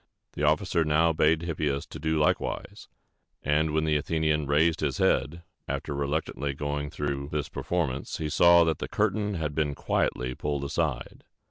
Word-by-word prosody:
The - - -6
officer 80 +3 +2
now 80 +2 +3
bade 80 +1 +2
Hippias 75 -4 -2
do 80 +2 -2
likewise; 75 - -1 0.6
and 75 +2 +2
when 80 +1 +1
the 75 -1 +2
Athenian 75 -1 0
raised 80 +3 +3
his 70 -4 -1
head, 85 +5 +1 0.2
after - - -3
reluctantly 70 0 -2
going 75 0 -3
through 70 -2 -3
this 75 -2 -2
performance, 75 -7 -2
he 80 - -3
saw 85 +3 +6
that 80 -2 0
the - - -3
curtain 105 -1 0
had 75 -3 -2
been 75 -1 -1
quietly 65 0 -1
pulled 70 +1 -3
aside. 70 - -2
75 Hz, 155 wpm, -27 LUFS, 70-80 Hz, 0.6 s, saw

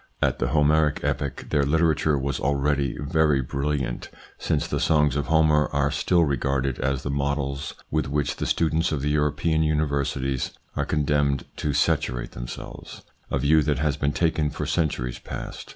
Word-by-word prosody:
At - - +1
the - - +1
Homeric 75 +2 +2
epoch 70 -1 -2
their 70 - +3
literature 80 0 +2
was 70 +1 -2
already 70 0 0
very 75 -1 +2
brilliant, 70 -1 -2 0.3
since - - 0
the - - -1
songs 75 -3 +3
of 70 - -1
Homer 80 -1 +4
are 70 0 +1
still 85 +3 +2
regarded 70 -2 -1
as 70 0 -1
the 70 - -2
models 70 0 -2 0.2
with 75 -1 0
which 70 0 -1
the - - -2
students 80 0 +1
of 70 -3 -2
the 75 - +1
European 75 +2 +1
universities 70 -4 -1 0.2
are - - 0
condemned 70 -2 +1
to 75 - -1
saturate 60 -3 0
themselves; - - -8 0.3
a - - 0
view 75 +4 +4
that 75 -2 0
has 75 0 0
been 70 -1 0
taken 80 -2 +1
for - - -4
centuries 60 -7 -1
past. - - -7
70 Hz, 165 wpm, -25 LUFS, 70-75 Hz, 0.3 s, Homer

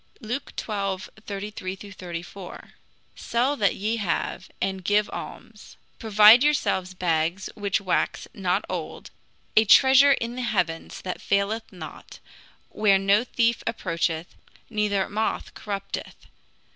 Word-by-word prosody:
Luke 245 +4 -5
xii. - - -5 0.6
33 200 -2 -5
34: 185 -2 -9 0.4
"Sell 250 +5 0
that 200 -4 +2
ye 215 +4 -1
have, 190 -1 -2
and 190 0 -2
give 205 +3 +2
alms; - - -9 0.2
provide 215 +1 +7
yourselves 190 -11 +1
bags 170 +1 -1
which 200 -2 -1
wax 190 -2 -1
not 185 -2 -1
old, - - -6 0.4
a 220 - +7
treasure 265 +5 +7
in 235 -2 -3
the 255 - -4
heavens 180 -9 -2
that 185 - -5
faileth 200 +3 0
not, 170 -5 -10 0.5
where 205 -2 +3
no 200 +3 +3
thief 235 -1 +1
approacheth, 165 -5 -2 0.4
neither 210 -3 0
moth 215 +2 -2
corrupteth. 200 -2 -5
200 Hz, 120 wpm, -25 LUFS, 185-220 Hz, 0.6 s, provide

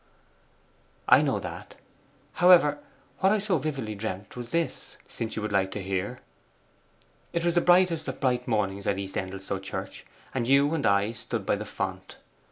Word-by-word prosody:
'I - - +8
know - - +1
that. - - -8 0.7
However, 170 -5 +6 0.4
what 190 0 +4
I 215 - +4
so 195 -5 +1
vividly 135 -7 -3
dreamt 100 -1 -5
was 120 -1 -7
this, 170 +3 -2
since 115 -1 -5
you 110 - -3
would 105 - -3
like 95 -1 +2
to 105 - -5
hear. 95 +6 -3 1.1
It 170 0 -1
was 170 - +2
the 175 - +3
brightest 175 -3 +4
of - - -5
bright 125 -2 0
mornings 100 -4 -1
at 100 - +1
East 95 -1 -5
Endelstow 95 +1 -4
Church, 95 - -6 0.3
and 120 -3 -1
you 140 +3 +4
and 160 -3 +1
I 100 +2 +3
stood 115 -2 -5
by - - +2
the - - -6
font. - - -5
120 Hz, 175 wpm, -27 LUFS, 100-160 Hz, 1.1 s, I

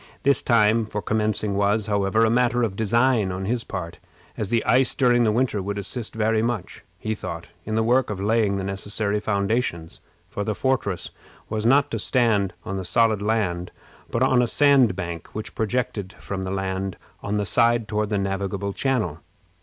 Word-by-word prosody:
This 140 -1 +3
time 110 -1 +3
for 105 - -3
commencing 105 -1 -1
was, 100 +1 +1
however, 105 +1 +2
a - - +2
matter 120 0 +2
of 105 -4 -1
design 115 -1 +2
on 95 +1 -4
his 115 +3 -1
part, 85 -5 -6 0.4
as 105 - -3
the 115 -1 +1
ice 130 0 +3
during 120 -2 +3
the 110 - +3
winter 115 -3 0
would 100 +2 -4
assist 110 +4 -5
very 110 0 +1
much, 115 -5 -3
he 110 - -3
thought, 85 -5 -7 0.2
in 110 - -2
the 110 - +2
work 125 +3 +2
of 105 -3 -4
laying 105 -1 +1
the 95 - -3
necessary 100 +2 -1
foundations; 100 -5 -2 0.3
for 100 - -4
the 105 0 -2
fortress 100 -10 -1 0.4
was 110 +1 -1
not 140 +3 +4
to - - -2
stand 110 -7 +1
on 95 - -3
the 95 - -3
solid 110 +3 +2
land, 100 -5 -1 0.4
but 115 - 0
on 130 -1 +4
a 120 - +2
sandbank 110 - +2
which 110 - -5
projected 110 -3 -2
from 95 -1 -6
the 95 - -4
land 95 -1 -3 0.2
on 105 +1 -2
the 105 - 0
side 115 +2 +3
toward 105 -1 -1
the 105 - 0
navigable 100 0 -2
channel. 125 - -1
105 Hz, 185 wpm, -24 LUFS, 100-115 Hz, 0.4 s, not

